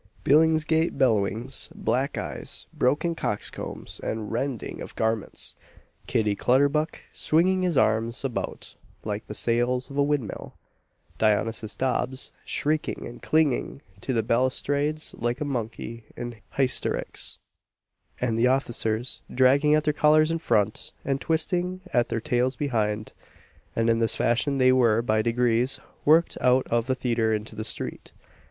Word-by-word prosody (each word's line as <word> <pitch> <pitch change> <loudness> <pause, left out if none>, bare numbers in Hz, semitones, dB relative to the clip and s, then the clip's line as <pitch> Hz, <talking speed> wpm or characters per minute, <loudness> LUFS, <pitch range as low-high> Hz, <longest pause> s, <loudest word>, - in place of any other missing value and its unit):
Billingsgate 160 +2 +3
bellowings, 110 -3 0
black - - -1
eyes, - - -4
broken 150 +6 +1
coxcombs, 105 -10 -4
and 110 -1 -4
rending 120 0 -3
of - - -8
garments; 110 -2 -1 0.5
Kitty 105 -2 +1
Clutterbuck 145 +7 +2
swinging 185 +4 +2
his 180 -5 +1
arms 115 0 +1
about 130 - -4 0.3
like 105 0 -4
the 105 - -5
sails 120 +3 0
of 140 - -6
a - - +4
windmill; 140 -6 -2 0.6
Dionysius 110 0 +1
Dobbs 130 0 -1
shrieking 155 +1 -1
and 120 - -9
clinging 155 -4 +1 0.2
to - - -2
the 115 -3 +1
balustrades 140 +6 0
like 120 +2 -1
a 150 - -2
monkey 115 -3 -4
in 120 -1 -5 0.2
hysterics; 135 -2 -1 0.8
and 115 -2 0
the 120 - +5
officers 120 -3 0
dragging 140 +4 +4
at 155 - +2
their 150 -1 +1
collars 155 +1 +4
in 165 - -1
front, 110 -8 0
and 135 0 0
twisting 180 +3 0
at 120 -1 +2
their 115 - -1
tails 125 +3 0
behind; 110 -6 -1 0.6
and 115 0 +1
in 115 0 +3
this 115 -1 +2
fashion 135 +4 +1
they 130 -1 +5
were, 120 -3 +4
by 110 -2 +2
degrees, 120 +2 +1 0.3
worked 160 +3 +4
out 125 +1 +4
of 115 0 +1
the 130 - +1
theatre 115 -3 0
into 110 +1 -6
the 110 - -4
street. - - -6
125 Hz, 140 wpm, -26 LUFS, 115-145 Hz, 0.8 s, the